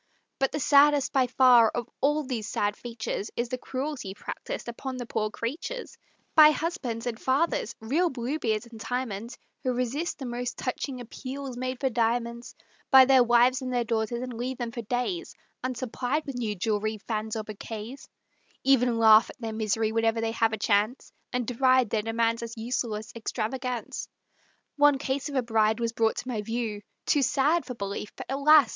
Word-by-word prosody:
But 270 Hz, -, +2 dB
the 300 Hz, -, -2 dB
saddest, 285 Hz, 0 st, +5 dB
by 265 Hz, -2 st, +3 dB
far, 245 Hz, -3 st, +6 dB
of 240 Hz, 0 st, -4 dB
all 295 Hz, +3 st, +2 dB
these 240 Hz, -6 st, -4 dB
sad 205 Hz, -2 st, 0 dB
features, 230 Hz, -3 st, -4 dB
Is 235 Hz, 0 st, -2 dB
the 255 Hz, -, -2 dB
cruelty 260 Hz, -8 st, -4 dB
practised -, -, -6 dB
upon 255 Hz, +2 st, -5 dB
the 245 Hz, -, -5 dB
poor 215 Hz, -2 st, -1 dB
creatures 305 Hz, -, -5 dB, 0.4 s
By 305 Hz, -1 st, +9 dB
husbands 295 Hz, -, -2 dB
and 240 Hz, -2 st, -3 dB
fathers, 265 Hz, -2 st, +1 dB
real 300 Hz, +11 st, +1 dB
Bluebeards 245 Hz, -4 st, -2 dB
and 230 Hz, -2 st, -12 dB
Timons, 235 Hz, -2 st, -4 dB, 0.2 s
Who 255 Hz, -, 0 dB
resist 255 Hz, +7 st, -2 dB
the 270 Hz, -, -6 dB
most 245 Hz, 0 st, -4 dB
touching 255 Hz, 0 st, -3 dB
appeals 260 Hz, +2 st, -6 dB
made 255 Hz, 0 st, -3 dB
for 265 Hz, -2 st, 0 dB
diamonds 235 Hz, 0 st, -1 dB, 0.3 s
By 265 Hz, -1 st, +9 dB
their 260 Hz, -1 st, +6 dB
wives 245 Hz, +2 st, +4 dB
and 255 Hz, -1 st, -4 dB
their 245 Hz, -1 st, +1 dB
daughters, 230 Hz, +1 st, -1 dB
and 255 Hz, -1 st, -5 dB
leave 245 Hz, +2 st, -4 dB
them 240 Hz, -2 st, -3 dB
for 235 Hz, -, -5 dB
days 250 Hz, -, -3 dB, 0.3 s
Unsupplied 255 Hz, +3 st, -2 dB
with 275 Hz, -, -5 dB
new 225 Hz, -4 st, -2 dB
jewelry, 215 Hz, +2 st, -1 dB
fans 215 Hz, 0 st, -3 dB
or 220 Hz, -, -2 dB
bouquets, 215 Hz, +4 st, -8 dB, 0.6 s
Even 250 Hz, -3 st, +3 dB
laugh 220 Hz, 0 st, +7 dB
at -, -, -12 dB
their 225 Hz, -2 st, -4 dB
miseries 220 Hz, 0 st, 0 dB
whenever 225 Hz, 0 st, +2 dB
they 225 Hz, 0 st, 0 dB
have 225 Hz, -1 st, +2 dB
a 220 Hz, -, -2 dB
chance, 210 Hz, +3 st, +1 dB, 0.2 s
And 250 Hz, -1 st, -1 dB
deride 255 Hz, -1 st, +3 dB
their 220 Hz, -, +1 dB
demands 230 Hz, +1 st, 0 dB
as 230 Hz, 0 st, -7 dB
useless 225 Hz, -1 st, -3 dB
extravagance. 245 Hz, +1 st, -3 dB, 0.7 s
One 290 Hz, -1 st, +5 dB
case 275 Hz, +1 st, -2 dB
of 285 Hz, -, -6 dB
a 260 Hz, -, +2 dB
bride 220 Hz, -1 st, +2 dB
was 230 Hz, -1 st, 0 dB
brought 225 Hz, -1 st, +2 dB
to -, -, -5 dB
my 230 Hz, -5 st, -2 dB
view, 225 Hz, -1 st, -3 dB, 0.2 s
Too 290 Hz, -, +3 dB
sad 295 Hz, +5 st, +2 dB
for 250 Hz, -, -5 dB
belief, 200 Hz, 0 st, -5 dB
but -, -, -7 dB
alas! 285 Hz, 0 st, +6 dB
245 Hz, 180 wpm, -27 LUFS, 225-265 Hz, 0.7 s, By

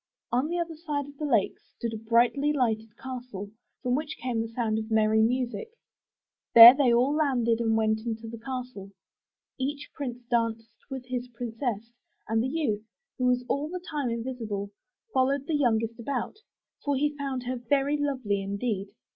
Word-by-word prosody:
On 250 Hz, +5 st, +2 dB
the 345 Hz, +2 st, -2 dB
other 340 Hz, -1 st, -2 dB
side 300 Hz, -3 st, -3 dB
of 285 Hz, 0 st, -13 dB
the 300 Hz, -, -1 dB
lake 225 Hz, -8 st, +1 dB
stood 230 Hz, -1 st, -6 dB
a -, -, -3 dB
brightly 235 Hz, +6 st, +2 dB
lighted 225 Hz, -6 st, -1 dB
castle, 245 Hz, -6 st, -7 dB, 0.3 s
from 250 Hz, -1 st, +1 dB
which 300 Hz, +3 st, -2 dB
came 240 Hz, -3 st, -1 dB
the 225 Hz, -, -3 dB
sound 225 Hz, -1 st, -1 dB
of 220 Hz, 0 st, -6 dB
merry 220 Hz, 0 st, +3 dB
music. 250 Hz, -, -1 dB, 0.8 s
There 235 Hz, +1 st, +13 dB
they 270 Hz, -3 st, +3 dB
all 250 Hz, +4 st, +3 dB
landed 250 Hz, -7 st, +2 dB
and 225 Hz, -1 st, +2 dB
went 220 Hz, 0 st, +2 dB
into 225 Hz, 0 st, -4 dB
the 230 Hz, 0 st, -8 dB
castle. 250 Hz, -5 st, -6 dB, 0.7 s
Each 280 Hz, +2 st, -3 dB
prince 245 Hz, -4 st, -5 dB
danced 230 Hz, -2 st, -1 dB, 0.2 s
with 265 Hz, -2 st, -6 dB
his 250 Hz, -1 st, -3 dB
princess; 235 Hz, -2 st, -4 dB, 0.4 s
and 225 Hz, +1 st, +1 dB
the 250 Hz, -, 0 dB
youth, 260 Hz, -8 st, -1 dB, 0.4 s
who 255 Hz, -, +1 dB
was 250 Hz, 0 st, +2 dB
all 290 Hz, +4 st, -1 dB
the 365 Hz, +1 st, -4 dB
time 290 Hz, -5 st, -1 dB
invisible, 230 Hz, -4 st, -4 dB, 0.4 s
followed 270 Hz, +1 st, +2 dB
the 320 Hz, -, -2 dB
youngest 230 Hz, -6 st, +2 dB
princess 235 Hz, -, -28 dB
about, 275 Hz, -, -2 dB, 0.5 s
for 285 Hz, -1 st, +1 dB
he 295 Hz, +2 st, 0 dB
found 275 Hz, -3 st, -3 dB
her 255 Hz, +1 st, -3 dB
very 275 Hz, +4 st, +1 dB
lovely 255 Hz, -9 st, -1 dB
indeed. 200 Hz, 0 st, -2 dB
245 Hz, 175 wpm, -28 LUFS, 225-275 Hz, 0.8 s, There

